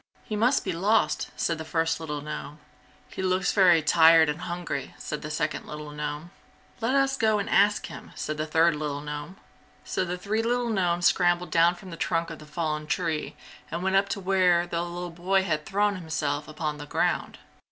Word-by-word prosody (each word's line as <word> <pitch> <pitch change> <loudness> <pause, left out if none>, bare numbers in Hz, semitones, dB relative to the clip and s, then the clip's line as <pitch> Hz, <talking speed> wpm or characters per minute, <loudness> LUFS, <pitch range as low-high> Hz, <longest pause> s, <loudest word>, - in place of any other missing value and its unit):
"He 215 - -4
must 240 +6 +2
be 190 - -1
lost!" 170 -3 +1
said 165 -2 -1
the - - -4
first 165 0 0
little 150 -2 -4
gnome. 150 0 -6 0.5
"He - - -6
looks 185 +1 +1
very 175 -5 +5
tired 160 +1 +6
and 150 +4 -3
hungry!" 170 -5 -4
said 150 - -5
the 150 - -6
second 150 - -2
little 150 0 -7
gnome. 150 +3 -5 0.5
"Let 240 +4 +1
us 270 -1 +3
go 220 -4 +2
and 200 - -2
ask 205 +1 +3
him!" - - -10
said 155 0 -4
the 155 0 -2
third 160 +1 +3
little 150 -1 -3
gnome. 150 +5 -6 0.5
So - - -1
the 180 0 -3
three 210 +5 -1
little 240 +1 0
gnomes 175 -4 +1
scrambled 175 -1 +3
down 170 +2 +4
from 180 +1 -11
the 165 - -7
trunk 165 -1 -1
of 165 - -8
the 150 - -13
fallen 150 -1 -3
tree 160 -2 -2 0.3
and 170 +2 -4
went 190 0 +1
up 200 +1 +3
to 200 - -2
where 180 -2 +3
the 170 -1 -2
little 175 0 -5
boy 185 +3 +1
had 155 -5 -2
thrown 205 0 +1
himself 150 -3 -2
upon 155 -1 -4
the 145 - -8
ground. - - -1
170 Hz, 200 wpm, -26 LUFS, 155-190 Hz, 0.5 s, tired